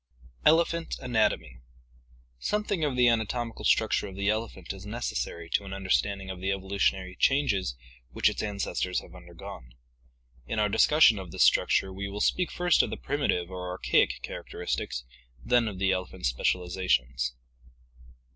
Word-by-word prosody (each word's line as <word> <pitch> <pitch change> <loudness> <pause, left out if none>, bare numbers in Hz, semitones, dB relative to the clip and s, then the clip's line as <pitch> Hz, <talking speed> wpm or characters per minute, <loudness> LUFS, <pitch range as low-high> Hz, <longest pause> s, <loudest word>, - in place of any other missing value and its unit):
ELEPHANT 170 +1 +3
ANATOMY 110 - 0 0.8
Something 210 - -1
of 145 -4 0
the 125 -1 +5
anatomical 115 0 0
structure 110 -1 +2
of 95 - -9
the 100 +1 0
elephant 110 -5 -4
is 95 -1 -10
neces 115 +4 -3
sary 85 0 -4
to - - +1
an 95 -1 -7
understanding 95 0 0
of 90 -1 -8
the 95 +1 0
evolutionary 95 -1 -1
changes 105 - +1 0.3
which - - +2
its - - 0
ancestors 100 -3 -2
have - - -15
undergone. - - -11 0.7
In 110 - -3
our 105 -1 +2
discussion 130 -2 +5
of 95 -2 -8
this - - +2
structure 95 0 +3
we 100 +1 -5
will 100 +1 -5
speak 180 +10 +1
first 175 -2 +3
of - - -2
the - - -4
primitive 95 -11 -1
or 90 -1 -5
archaic 90 - +1
characteristics, - - -4 0.4
then 120 -2 +3
of 100 -3 -5
the 95 0 +2
elephant's 95 -5 -2
specializations. 65 -6 0
100 Hz, 150 wpm, -28 LUFS, 90-120 Hz, 0.8 s, the